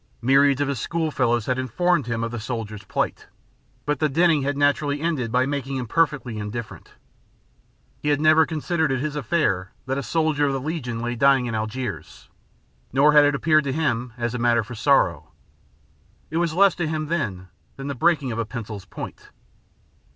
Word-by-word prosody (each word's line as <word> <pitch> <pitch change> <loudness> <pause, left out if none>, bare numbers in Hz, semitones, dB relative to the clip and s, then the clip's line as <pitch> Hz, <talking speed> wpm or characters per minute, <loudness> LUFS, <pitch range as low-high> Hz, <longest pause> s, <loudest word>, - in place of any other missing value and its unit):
Myriads 135 +2 +4
of 145 - +1
his 140 -4 -2
school 165 +4 -2
fellows 120 -5 +1
had 130 0 -1
informed 160 +4 +1
him 115 -1 -2
of 115 - -3
the 120 - -4
soldier's 110 -2 -5
plight, - - -3 0.6
but 150 -2 -1
the 155 - +2
dinning 160 +1 +3
had 140 +1 -1
naturally 145 0 +1
ended 150 -8 -1
by 125 +1 +2
making 135 -1 -3
him 125 - -3
perfectly 135 -5 0
indifferent. 110 +2 -7 1.1
He 150 - -2
had 145 -1 +2
never 155 +1 +5
considered 160 -1 -1
it 130 - 0
his 150 +2 -3
affair 110 - 0
that 135 +2 -1
a - - -2
soldier 155 -2 +1
of 135 - 0
the 135 - -1
Legion 130 -6 -4
lay 120 0 -2
dying 135 +1 +4
in 120 - -3
Algiers, 110 - -5 0.6
nor 145 +3 +4
had 150 -1 +7
it 145 0 +2
appeared 155 +1 +3
to 135 - -1
him 125 -6 -1
as 120 -1 -2
a 125 - -3
matter 120 -1 +3
for 120 +4 -9
sorrow. 135 +4 +1 1.0
It 160 - -1
was 170 -2 0
less 195 0 +5
to 175 -3 -1
him 155 0 -2
than 110 - -3 0.3
the 140 +1 -4
breaking 150 -2 +1
of 115 - -3
a - - +1
pencil's 110 -4 -7
point. - - -9
135 Hz, 190 wpm, -23 LUFS, 120-155 Hz, 1.1 s, had